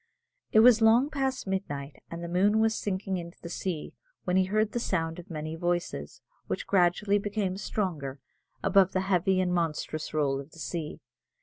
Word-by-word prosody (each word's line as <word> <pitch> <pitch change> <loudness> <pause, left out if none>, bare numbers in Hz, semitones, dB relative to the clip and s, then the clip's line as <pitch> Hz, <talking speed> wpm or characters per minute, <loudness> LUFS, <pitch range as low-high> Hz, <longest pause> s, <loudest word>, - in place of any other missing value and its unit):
It 220 - +7
was 230 -1 +7
long 235 +6 +5
past 270 -2 -1
midnight, 145 -8 -4
and 170 0 -6
the - - -4
moon 195 +5 +3
was 225 0 +3
sinking 195 -3 -2
into 170 0 -8
the 170 - -8
sea, 170 -2 -4 0.3
when 180 - 0
he 190 0 +4
heard 215 +3 +1
the 240 - -1
sound 165 -6 -1
of 175 +3 -11
many 155 -1 -4
voices, 175 - -2 0.3
which - - -3
gradually 200 +2 +3
became 200 -2 -2
stronger, 165 -10 -3 0.4
above 195 -2 +4
the 185 - +1
heavy 190 0 +2
and 180 -1 +1
monotonous 155 -2 -2
roll 140 -3 +1
of 140 +3 -10
the - - -14
sea. 155 +4 -5
185 Hz, 180 wpm, -28 LUFS, 165-205 Hz, 0.4 s, It